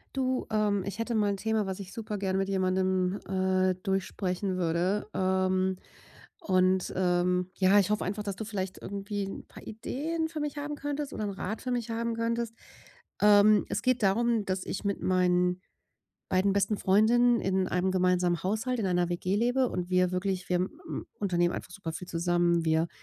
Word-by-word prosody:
Du, 260 Hz, -1 st, 0 dB
ähm, 210 Hz, -3 st, +1 dB
ich 200 Hz, +2 st, -5 dB
hätte 230 Hz, +1 st, -2 dB
mal 210 Hz, -2 st, +2 dB
'n -, -, -2 dB
Thema, 220 Hz, 0 st, 0 dB
was 190 Hz, +1 st, -4 dB
ich 190 Hz, -1 st, -8 dB
super 215 Hz, -2 st, -5 dB
gern 190 Hz, -1 st, -1 dB
mit 195 Hz, 0 st, 0 dB
jemandem, 185 Hz, 0 st, +1 dB
äh, 185 Hz, 0 st, +2 dB
durchsprechen 190 Hz, 0 st, -2 dB
würde, 180 Hz, +3 st, 0 dB
ähm, 185 Hz, 0 st, +1 dB, 0.6 s
und 185 Hz, -1 st, +2 dB
ähm, 180 Hz, 0 st, +1 dB
ja, 195 Hz, +1 st, +5 dB
ich 195 Hz, -, -1 dB
hoffe 210 Hz, -, 0 dB
einfach, 205 Hz, +3 st, -3 dB
dass 200 Hz, -2 st, -4 dB
du 220 Hz, -, -5 dB
vielleicht 195 Hz, -3 st, -4 dB
irgendwie 200 Hz, 0 st, -4 dB
'n 195 Hz, -, -8 dB
paar -, -, -13 dB
Ideen 305 Hz, +9 st, -3 dB
für 320 Hz, -1 st, -5 dB
mich 295 Hz, 0 st, -3 dB
haben 295 Hz, 0 st, -4 dB
könntest 290 Hz, 0 st, -4 dB
oder 215 Hz, -, -3 dB
'n 205 Hz, -, -2 dB
Rat 195 Hz, +2 st, -5 dB
für 255 Hz, -, -3 dB
mich 240 Hz, -1 st, -2 dB
haben 230 Hz, 0 st, -1 dB
könntest, 230 Hz, 0 st, -2 dB, 0.7 s
ähm. 210 Hz, 0 st, +6 dB
Es 200 Hz, -, -2 dB
geht 255 Hz, -2 st, +1 dB
darum, 225 Hz, +2 st, +2 dB
dass 185 Hz, -1 st, -2 dB
ich 195 Hz, -, -4 dB
mit 200 Hz, -1 st, -1 dB
meinen 180 Hz, -1 st, +2 dB, 0.7 s
beiden 190 Hz, +1 st, +2 dB
besten 200 Hz, +1 st, +1 dB
Freundinnen 235 Hz, +5 st, +4 dB
in 190 Hz, -1 st, 0 dB
einem 180 Hz, +1 st, +1 dB
gemeinsamen 180 Hz, -2 st, +2 dB
Haushalt, 220 Hz, +6 st, -1 dB
in 200 Hz, -, 0 dB
einer 180 Hz, -1 st, +1 dB
WG 180 Hz, +3 st, -1 dB
lebe 245 Hz, +3 st, +2 dB
und 180 Hz, 0 st, -3 dB
wir 180 Hz, 0 st, +3 dB
wirklich 185 Hz, 0 st, -2 dB
wir, 180 Hz, -, +2 dB
m 305 Hz, -, -4 dB
unternehmen 175 Hz, -3 st, +1 dB
einfach -, -, -6 dB
super 180 Hz, -3 st, -6 dB
viel 180 Hz, +3 st, -7 dB
zusammen, 170 Hz, 0 st, +1 dB
wir 160 Hz, +1 st, +2 dB
195 Hz, 185 wpm, -29 LUFS, 185-220 Hz, 0.7 s, ähm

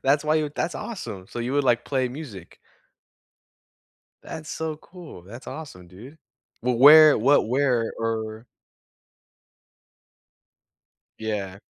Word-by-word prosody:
that's 140 Hz, +2 st, +2 dB
why 155 Hz, +1 st, +2 dB
you 155 Hz, -2 st, -1 dB
that's 165 Hz, -, -2 dB
awesome, 110 Hz, -, -7 dB
so -, -, -8 dB
you 120 Hz, +2 st, -3 dB
would, 145 Hz, 0 st, +1 dB
like, 120 Hz, -2 st, +2 dB
play 130 Hz, -2 st, -1 dB
music. 120 Hz, -, -10 dB, 1.7 s
That's 155 Hz, -1 st, -9 dB
so 160 Hz, -1 st, -4 dB
cool. 170 Hz, -, -13 dB
That's 115 Hz, +8 st, -12 dB
awesome, 90 Hz, -, -9 dB
dude. 115 Hz, -, -13 dB, 0.5 s
Well, 125 Hz, 0 st, 0 dB
where 150 Hz, +2 st, +8 dB
what 135 Hz, 0 st, +3 dB
where 125 Hz, -3 st, +1 dB
or 110 Hz, 0 st, -4 dB, 2.8 s
Yeah. 100 Hz, -3 st, -4 dB
125 Hz, 120 wpm, -24 LUFS, 110-150 Hz, 2.8 s, where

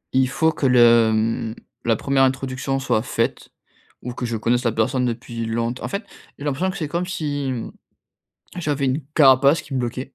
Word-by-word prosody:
Il 130 Hz, -1 st, +3 dB
faut 160 Hz, +5 st, +2 dB
que 145 Hz, -3 st, 0 dB
le, 120 Hz, -2 st, +6 dB
mmh, 110 Hz, 0 st, -1 dB, 0.3 s
la 115 Hz, -1 st, +3 dB
1re 135 Hz, +4 st, +1 dB
introduction 130 Hz, 0 st, -1 dB
soit 125 Hz, -5 st, 0 dB
faite -, -, -2 dB, 0.5 s
ou 125 Hz, -, -5 dB
que 125 Hz, -, -4 dB
je 115 Hz, -1 st, -2 dB
connaisse 120 Hz, +3 st, +1 dB
la 115 Hz, -, +1 dB
personne 125 Hz, +4 st, 0 dB
depuis 115 Hz, -1 st, -4 dB
longte 115 Hz, +2 st, -2 dB
en -, -, -3 dB
fait, 200 Hz, +2 st, -4 dB, 0.3 s
j'ai 145 Hz, -, -8 dB
l'impression 145 Hz, +7 st, 0 dB
que 190 Hz, -, -5 dB
c'est 155 Hz, -5 st, -3 dB
comme 170 Hz, +4 st, -2 dB
si, 145 Hz, -6 st, -3 dB
mmh, 120 Hz, -3 st, -5 dB, 0.9 s
j'avais 145 Hz, -5 st, -1 dB
une 135 Hz, +4 st, 0 dB
carapace 140 Hz, +2 st, +5 dB
qui 140 Hz, -, -13 dB
me 130 Hz, -, 0 dB
bloquait 125 Hz, +2 st, -4 dB
130 Hz, 195 wpm, -22 LUFS, 115-145 Hz, 0.9 s, le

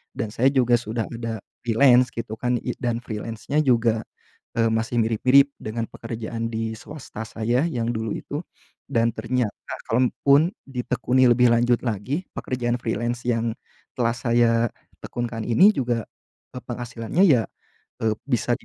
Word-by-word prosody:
dan 110 Hz, -, -2 dB
saya 125 Hz, +4 st, +4 dB
juga 125 Hz, -2 st, +4 dB
sudah 115 Hz, 0 st, -3 dB
ada 115 Hz, -2 st, -4 dB, 0.3 s
freelance 125 Hz, +1 st, +5 dB
gitu 115 Hz, -2 st, -5 dB
kan 125 Hz, 0 st, +1 dB
i -, -, -3 dB
dan 120 Hz, -1 st, -1 dB
freelance-nya 115 Hz, +6 st, -3 dB
juga, 115 Hz, -4 st, +2 dB, 0.5 s
eee, 115 Hz, -1 st, +4 dB
masih 115 Hz, +2 st, 0 dB
mirip-mirip 130 Hz, +5 st, +4 dB
dengan 115 Hz, +1 st, -3 dB
pekerjaan 115 Hz, -1 st, -5 dB
di 110 Hz, 0 st, -2 dB
swasta 140 Hz, -5 st, -8 dB
saya 120 Hz, +5 st, 0 dB
yang 120 Hz, -7 st, -2 dB
dulu 110 Hz, -1 st, -3 dB
itu 145 Hz, -, -5 dB, 0.5 s
dan 115 Hz, -3 st, +2 dB
ternyata 125 Hz, -5 st, -1 dB, 0.4 s
kalaupun 140 Hz, +7 st, +3 dB, 0.2 s
ditekuni 125 Hz, 0 st, +1 dB
lebih 125 Hz, 0 st, +5 dB
lanjut 120 Hz, 0 st, +3 dB
lagi 120 Hz, -, -2 dB, 0.2 s
pekerjaan 120 Hz, -1 st, -1 dB
freelance 120 Hz, +1 st, -2 dB
yang 115 Hz, -1 st, +1 dB, 0.5 s
telah 115 Hz, -2 st, +2 dB
saya 115 Hz, -1 st, +2 dB, 0.3 s
tekun 120 Hz, -, -3 dB
kan 115 Hz, -1 st, -5 dB
ini 150 Hz, -, +6 dB
juga, 120 Hz, -4 st, -1 dB, 0.5 s
pe 125 Hz, -, -5 dB
penghasilannya 120 Hz, -, -1 dB
ya, 125 Hz, -8 st, +5 dB, 0.6 s
eee, 110 Hz, -1 st, +2 dB
bisa 120 Hz, -2 st, +1 dB
di -, -, -22 dB
120 Hz, 145 wpm, -24 LUFS, 115-125 Hz, 0.6 s, ini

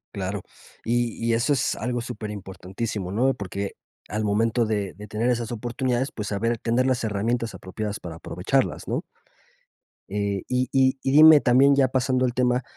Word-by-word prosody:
Claro, 95 Hz, 0 st, -3 dB, 0.4 s
y 120 Hz, 0 st, 0 dB
y 115 Hz, -, +2 dB
eso 120 Hz, +5 st, +2 dB
es 125 Hz, -2 st, 0 dB
algo 120 Hz, +1 st, -2 dB
súper 115 Hz, -3 st, -6 dB
importantísimo, 95 Hz, 0 st, -5 dB
¿no?, 130 Hz, +5 st, +2 dB
porque 100 Hz, -1 st, -5 dB, 0.3 s
al 110 Hz, 0 st, -2 dB
momento 115 Hz, +3 st, +2 dB
de 105 Hz, -3 st, -2 dB
de 105 Hz, +3 st, -11 dB
tener 110 Hz, +4 st, -1 dB
esas 120 Hz, -1 st, -1 dB
oportunidades, 120 Hz, +3 st, -1 dB
pues, 105 Hz, -2 st, -5 dB
saber 115 Hz, +4 st, -1 dB
tener 120 Hz, +3 st, +1 dB
las 130 Hz, -1 st, +1 dB
herramientas 115 Hz, +3 st, -1 dB
apropiadas 105 Hz, +3 st, -5 dB
para 85 Hz, -2 st, -7 dB
aprovecharlas, -, -, -1 dB
¿no? -, -, -1 dB, 1.1 s
Eh, 100 Hz, -1 st, -2 dB
y 125 Hz, 0 st, 0 dB
y 130 Hz, 0 st, +3 dB
y 135 Hz, -, +1 dB
dime 155 Hz, +1 st, +9 dB
también 135 Hz, +3 st, +5 dB
ya 135 Hz, -1 st, +4 dB
pasando 130 Hz, 0 st, +1 dB
al 120 Hz, -, -1 dB
tema 125 Hz, 0 st, +1 dB
115 Hz, 170 wpm, -24 LUFS, 105-125 Hz, 1.1 s, dime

